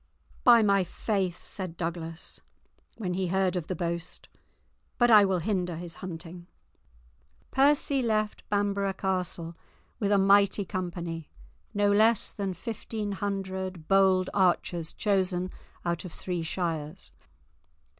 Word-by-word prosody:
"By 235 -2 +7
my 200 -2 +4
faith," 185 0 -2
said 185 -4 -5
Douglas, 165 -1 -4 0.6
when 185 -5 -2
he 185 0 -1
heard 190 0 +1
of 175 -3 -3
the 185 - -2
boast, 170 +1 -4 0.7
"but 240 -1 +4
I 210 -2 +9
will 190 -1 +1
hinder 180 -1 -1
his 170 0 -6
hunting." 175 -1 -7 1.0
Percy 280 0 +3
left 215 -3 0
Bamborough 200 -1 +1
Castle 180 -3 -2 0.4
with 205 -3 0
a 205 - +5
mighty 200 +1 +4
company, 175 -4 -4 0.5
no 205 0 +3
less 220 +2 +4
than 195 -3 -3
fifteen 215 +2 -4
hundred 190 -3 -3
bold 190 -1 +4
archers 175 -3 +1
chosen 185 -3 0 0.3
out 170 -1 -1
of 180 - -7
three 180 0 -4
shires. 160 - -3
190 Hz, 125 wpm, -28 LUFS, 175-205 Hz, 1.0 s, I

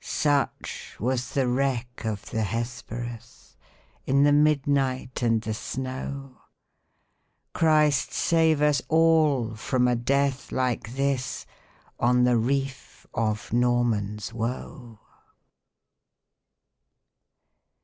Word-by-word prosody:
Such 145 -2 -1
was 125 +2 -1
the 135 -2 +2
wreck 125 -2 -1
of 105 -2 -4
the 110 - -1
Hesperus, 120 +2 -6 0.5
In 140 +1 +4
the 145 - +5
midnight 140 -4 +1
and 115 -2 +2
the 110 0 -2
snow! 130 +3 -6 1.1
Christ 155 -3 +3
save 160 -3 +2
us 150 -1 +3
all 155 -7 +3
from 125 +3 0
a 125 - +2
death 135 +3 0
like 125 -2 -2
this, 135 -2 -1 0.5
On 125 +1 +3
the 125 -1 +4
reef 135 +3 -2
of 110 -1 -2
Norman's 115 -4 0
Woe! 115 0 -5
125 Hz, 95 wpm, -26 LUFS, 120-140 Hz, 1.1 s, the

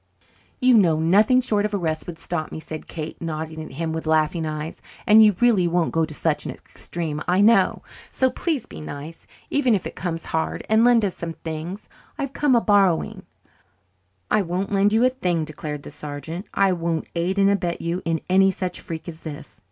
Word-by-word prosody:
"You 255 -1 +5
know 175 -8 +4
nothing 210 +10 +4
short 210 -5 +1
of 210 -1 -1
arrest 160 -5 -2
would 175 -2 -6
stop 165 -2 -4
me," - - -6
said 155 0 -8
Kate, 160 -1 -7
nodding 160 -1 -4
at 155 - -10
him 160 +3 -3
with 160 0 -4
laughing 160 +1 +1
eyes, 155 +1 -5 0.2
"and 220 -1 +8
you 210 -3 +5
really 225 -8 +4
won't 170 -1 +1
go 165 -1 +2
to 155 - -9
such - - 0
an - - -5
extreme, 160 -3 -5
I 180 +1 +2
know. 225 +3 +4 0.3
So 260 -1 +2
please 310 -9 -2
be - - -10
nice, 150 +2 -8 0.2
even 260 -6 +3
if 190 - -3
it - - -6
comes 165 -3 -4
hard, 160 0 -2
and 220 +1 +4
lend 235 -3 +5
us 190 - -2
some 165 -1 -5
things. 165 +5 -6 0.3
I've 275 -3 -4
come 290 -4 +3
a 235 - +4
borrying." 195 -6 +2 1.0
"I 215 - +4
won't 185 +2 -3
lend 200 +1 +3
you 225 +3 +4
a - - +5
thing," 180 -10 -1
declared 150 -1 -6
the - - -9
sergeant. 150 +5 -7
"I 195 -1 +3
won't 165 -2 -2
aid 175 +3 -1
and 200 0 +4
abet 175 -4 -1
you 170 +2 -2
in 165 -1 -1
any 195 +1 +5
such 185 -1 -4
freak 160 0 -7
as 165 -1 -8
this. 150 -5 -9
175 Hz, 205 wpm, -23 LUFS, 160-205 Hz, 1.0 s, and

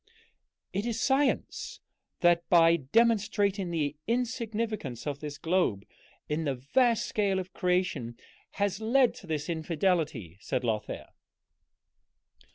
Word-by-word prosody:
"It 205 +4 -1
is 230 -1 -2
science 270 +2 0 0.4
that, 175 -1 +3
by 165 -1 +6
demonstrating 205 - +2
the 150 -4 -1
insignificance 225 - -2
of 145 -2 -3
this 150 -1 -6
globe 160 - 0 0.4
in 150 +2 -1
the 140 -3 -1
vast 230 - +2
scale 200 -3 0
of 185 -1 -5
creation, 180 -10 -1 0.4
has 200 0 -1
led 245 +3 +3
to 185 - -13
this 150 -2 -2
infidelity," 160 - -1
said 125 - -2
Lothair. 110 -3 -3
180 Hz, 115 wpm, -29 LUFS, 150-220 Hz, 0.4 s, by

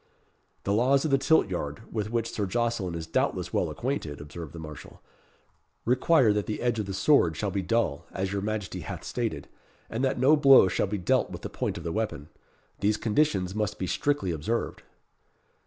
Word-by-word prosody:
"The 100 - 0
laws 135 +6 +3
of 155 - 0
the 135 - +4
tilt 160 -3 +4
yard, 90 +1 -4
with 105 -2 -2
which 115 0 -1
Sir 100 -2 -2
Jocelyn 115 -5 -1
is 80 -1 -4
doubtless 80 - -1
well - - +1
acquainted," 115 - -3
observed 75 +1 -8
the 85 - -10
marshal, 75 -2 -10 0.9
"require 130 -1 +4
that 105 -1 -1
the 110 - -3
edge 120 -2 0
of 105 - -2
the 95 - -4
sword 95 - +3
shall 100 +2 -1
be 100 - -1
dull, 110 -8 0
as 95 +1 -2
your 100 - -1
Majesty 105 -3 -3
hath - - -7
stated, - - -3 0.4
and 115 +4 -2
that 130 - +1
no 135 +5 +5
blow 135 -8 +7
shall 95 - 0
be 105 +2 -2
dealt 90 -3 +1
with - - -8
the - - -4
point - - -2
of 85 - -7
the 85 - -3
weapon. 80 -8 -3 0.5
These 105 +1 +2
conditions 105 -6 +1
must 105 0 -2
be 95 - -2
strictly 100 -1 0
observed." 85 +9 -2
105 Hz, 195 wpm, -27 LUFS, 90-120 Hz, 0.9 s, blow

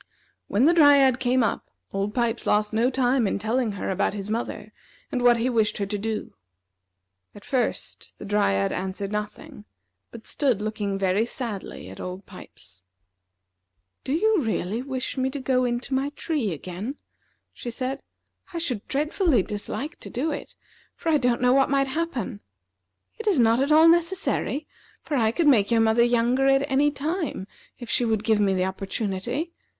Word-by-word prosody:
When 220 +7 +2
the 335 - +6
Dryad 280 -5 +6
came 255 -1 +2
up, 220 - -2 0.2
Old 200 +1 -2
Pipes 235 -1 -1
lost 210 +1 +2
no 230 +3 +3
time 255 -2 +2
in - - -1
telling 220 +2 -1
her 195 - -3
about 190 +2 0
his 205 +1 -5
mother, 215 -2 -4 0.4
and 250 - -1
what 245 -1 +5
he 230 +2 0
wished 225 -4 +1
her 200 - -1
to 205 +1 -3
do. 220 +1 -4 1.0
At 205 - -13
first, 255 -3 -3
the - - -9
Dryad 100 - +1
answered 190 +2 -4
nothing, 210 0 -6 0.5
but 230 -1 -12
stood 260 -8 +1
looking 210 -2 -2
very 195 +2 +2
sadly 230 - -5
at 95 - -11
Old 185 +2 -6
Pipes. 95 - -13 1.2
"Do - - -4
you 420 +3 +3
really 220 -2 -2
wish 265 0 -4
me 260 0 +1
to 280 +2 -5
go 255 -1 +1
into 245 +2 -2
my 270 +2 +1
tree 285 - -1
again?" 185 - -5 0.6
she 240 - -6
said. 255 +3 -4 0.5
"I - - -3
should 255 -11 -2
dreadfully 300 - +1
dislike 260 - -5
to - - -9
do 295 +6 -2
it, 290 - -7 0.4
for 330 - -3
I 305 -2 +4
don't 245 -2 +1
know 250 0 +4
what 270 0 +4
might 275 -1 +2
happen. 265 - -3 0.8
It 450 - -6
is 380 -9 +3
not 230 +1 +4
at 280 +2 +1
all 315 +2 +7
necessary, 335 -3 +1 0.4
for 300 - -3
I 225 -4 +3
could 305 +7 +1
make 220 -8 +5
your 230 -1 +3
mother 225 +1 +4
younger 240 +3 +2
at 270 +1 +3
any 285 +2 +4
time 300 - -3 0.3
if 240 - -9
she 235 - +1
would 220 -3 0
give 220 -1 +2
me 195 -2 +2
the 185 0 +1
opportunity. 195 - -3
240 Hz, 175 wpm, -25 LUFS, 210-275 Hz, 1.2 s, all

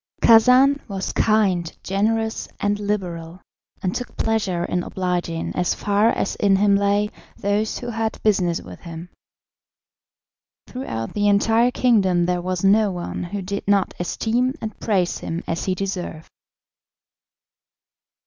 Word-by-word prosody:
Khacan 250 +5 +6
was 195 -2 -3
kind, 195 -6 +1
generous, 220 +3 -1
and 205 0 0
liberal, 180 -5 -3 0.4
and 185 0 0
took 245 - -6
pleasure 200 -6 0
in 180 - -1
obliging, 175 -3 -2
as 180 -1 0
far 205 +2 +2
as 195 - -1
in 200 -2 +3
him 200 +1 +4
lay, 200 +1 +1 0.3
those 205 +2 -1
who 240 - -6
had 225 -1 -2
business 180 -5 +2
with 90 -1 -11
him. 170 +1 -9 1.6
Throughout 115 - -5
the 205 0 +1
entire 225 +4 +3
kingdom 195 -9 +2
there 180 0 0
was 185 0 -3
no 205 +2 +4
one 175 -1 -4
who 195 +2 -5
did 200 +2 -5
not 200 -2 +2
esteem 240 +8 0
and 215 -1 -6
praise 190 -5 0
him 165 +1 -4
as 165 - -3
he 185 - 0
deserved. 180 -4 -5
200 Hz, 135 wpm, -22 LUFS, 180-220 Hz, 1.6 s, Khacan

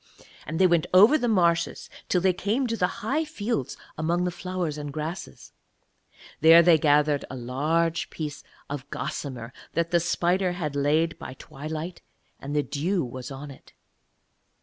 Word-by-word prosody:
And 160 - -3
they 190 - +5
went 170 -3 +3
over 210 +10 +8
the 245 -6 +1
marshes 170 -6 +1 0.2
till 180 - +2
they 185 0 +3
came 215 +9 0
to 230 -2 -1
the 210 +3 -2
high 290 +7 +1
fields 230 - -3 0.2
among 170 +3 +1
the 180 - 0
flowers 180 -3 -3
and 145 -1 -5
grasses. 155 +4 -6 0.6
And - - -31 0.2
there 165 +2 +8
they 165 -2 +6
gathered 145 -1 +3
a - - -6
large 155 +7 0
piece 150 -2 -6 0.2
of 140 -1 -6
gossamer 125 -3 -5 0.2
that 170 0 0
the 175 - +4
spider 175 +2 +1
had 155 -5 -4
laid 155 +4 +1
by 130 - -8
twilight; 155 +6 -7 0.4
and 145 +2 -5
the 145 - +2
dew 165 +4 -1
was 125 +1 -7
on 140 +1 -8
it. 135 - -16
165 Hz, 165 wpm, -26 LUFS, 145-180 Hz, 0.6 s, over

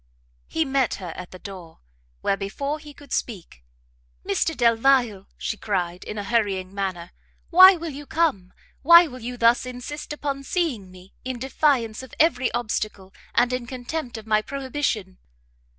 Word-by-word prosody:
He 320 0 0
met 270 -3 +1
her 175 -4 -7
at 180 -1 -8
the 185 - -11
door, 180 -4 -11 0.4
where, - - +1
before 275 +10 -3
he 300 0 -11
could 285 -1 -11
speak, 175 - -4 0.6
"Mr 315 +11 0
Delvile," 235 -3 +3
she 220 - -3
cried, 180 -4 -2
in 210 - -6
a 205 - -3
hurrying 195 -4 0
manner, 185 -3 -4 0.4
"why 370 +2 +10
will 330 -1 -5
you 290 +1 -9
come? 265 - 0 0.3
Why 340 +3 +9
will 255 -5 -9
you 245 +2 -5
thus 235 +1 +4
insist 255 +5 -7
upon 285 -2 -3
seeing 275 - -2
me, 185 +1 -16
in 255 -1 -4
defiance 260 -3 +1
of 260 - -12
every 260 -6 +3
obstacle, 215 -4 -3 0.2
and 245 +1 +3
in 250 -1 -3
contempt 255 0 -5
of 220 - -9
my 215 -1 +2
prohibition?" 260 -7 -3
240 Hz, 160 wpm, -24 LUFS, 200-275 Hz, 0.6 s, why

